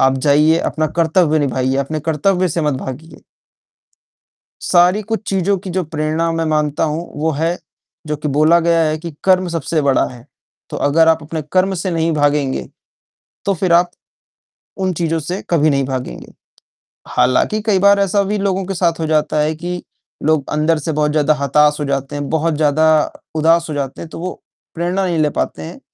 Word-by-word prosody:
आप 135 0 +3
जाइए, 150 +4 +3
अपना 155 -1 -1
कर्तव्य 160 -1 +3
निभाइए, 130 -2 0
अपने 140 +3 -2
कर्तव्य 180 +5 +1
से 165 +1 -2
मत 150 -2 +1
भागिए। 135 +5 -8 1.4
सारी 180 +3 +3
कुछ 220 +2 -3
चीज़ों 195 +1 +1
की 185 0 -8
जो 185 +1 -1
प्रेरणा 155 +1 -1
मैं 165 0 -1
मानता 150 -1 0
हूँ, 160 +2 -3
वो 155 +2 0
है 165 +4 -1 0.5
जो 150 - -2
कि 150 +1 -4
बोला 155 +4 +4
गया 170 0 +2
है 155 0 -1
कि 170 +1 -7
कर्म 185 -1 +3
सबसे 165 -1 -1
बड़ा 140 -2 +2
है। 120 -1 -13 0.4
तो - - -4
अगर 160 +3 +3
आप 160 -1 +3
अपने 155 +1 -5
कर्म 190 +1 +2
से 185 +2 -3
नहीं 165 -1 0
भागेंगे, 145 -2 0 0.8
तो 200 - +2
फिर 180 -1 0
आप 175 +1 +4 0.9
उन 190 -1 0
चीज़ों 165 0 -1
से 175 +6 -5
कभी 155 -3 +3
नहीं 140 -1 +1
भागेंगे। 130 - -6 0.8
हालाँकि, 130 +12 +1
कई 210 -3 +1
बार 200 +1 +5
ऐसा 200 +1 +2
भी 205 +2 -2
लोगों 195 -1 -1
के 195 - -3
साथ 170 -2 0
हो 160 - -1
जाता 155 -1 +1
है 155 +1 0
कि 175 +2 -5 0.4
लोग 155 -2 +1
अंदर 155 +2 +1
से 155 +2 -3
बहुत 150 0 0
ज़्यादा 155 0 +2
हताश 150 +1 +2
हो 150 - -2
जाते 140 0 -3
हैं, 145 -1 -4
बहुत 160 +1 0
ज़्यादा 155 +1 +2 0.2
उदास 165 +2 +3
हो - - -3
जाते 135 -2 -4
हैं, 165 - -8
तो - - -9
वो 180 +2 -6 0.3
प्रेरणा 175 +3 -1
नहीं 175 -2 -1
ले 150 -1 +2
पाते 80 - -3
हैं। 80 - -8
160 Hz, 190 wpm, -17 LUFS, 150-175 Hz, 1.4 s, बार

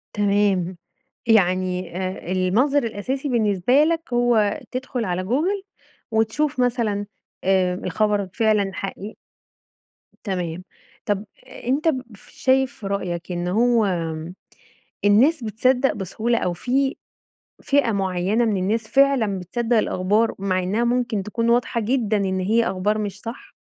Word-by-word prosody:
تمام. 200 -3 +1 0.5
يعني 185 -4 +2
آآ 185 -1 -4
المنظر 220 +11 +2
الأساسي 255 +6 -3
بالنسبة 230 +3 +3
لك 325 -4 -1
هو 235 -4 +2
تدخل 255 -2 -3
على 180 -1 -2
Google 325 - 0 0.5
وتشوف 225 +6 0
مثلًا 230 -5 0 0.4
آآ 185 -1 +2
الخبر 210 -2 0
فعلًا 215 -4 +2
حقيقي؟ 195 +2 -6 1.1
تمام. 180 -4 -3 0.4
طَب 205 0 -1 0.2
أنت 280 +7 -1 0.4
شايف 265 -1 +1
في 200 - -5
رأيك 180 -3 -3
إن 175 0 -2
هو 230 +4 +3 1.2
الناس 245 +9 +4
بتصدق 250 +5 +2
بسهولة، 220 +4 -1
أو 180 - -1
في 265 +9 0 0.7
فئة 280 -5 +2
معيَّنة 195 +3 0
من 215 -3 +1
الناس 215 +4 -1
فعلًا 270 -8 +3
بتصدق 235 +6 -1
الأخبار 210 +3 +1
مع 185 -1 0
إنها 205 +6 0
ممكن 240 -3 0
تكون 230 +4 -1
واضحة 240 0 +1
جدًا 225 -2 +1
إن 190 -2 0
هي 220 +5 +2
أخبار 205 +3 0
مش 205 -2 -4
صح؟ 230 +1 -9
215 Hz, 120 wpm, -22 LUFS, 190-245 Hz, 1.2 s, الناس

